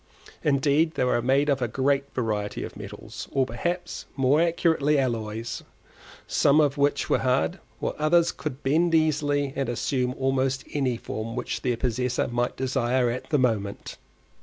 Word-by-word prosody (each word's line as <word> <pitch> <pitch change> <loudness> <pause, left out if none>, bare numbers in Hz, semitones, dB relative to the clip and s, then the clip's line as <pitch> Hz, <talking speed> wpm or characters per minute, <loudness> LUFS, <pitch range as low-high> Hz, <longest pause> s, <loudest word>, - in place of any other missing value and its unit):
Indeed 150 +3 +2
they - - +1
were 125 -1 +2
made 135 +4 +2
of 140 -2 +1
a 120 - +1
great 140 +3 +1
variety 105 -4 -2
of - - -7
metals, - - -8
or, 135 -1 +2
perhaps 175 +10 -4
more 135 +3 +3
accurately, 165 -3 +2
alloys, 115 -3 -2 0.6
some 145 +2 +3
of 145 -2 +3
which 145 0 +1
were - - +2
hard, 135 +8 +1 0.2
while - - -2
others 165 +2 +3
would 145 -2 -4
bend 165 +5 +3
easily 145 -3 +1
and 135 -3 -1
assume 125 +1 -1
almost 135 0 0
any 130 -5 0
form 115 0 -5
which - - -3
their 125 -2 0
possessor 125 +1 0
might 120 0 -1
desire 130 -1 +1
at 125 - -6
the 150 - +3
moment. 110 -6 -1
135 Hz, 160 wpm, -26 LUFS, 125-145 Hz, 0.6 s, more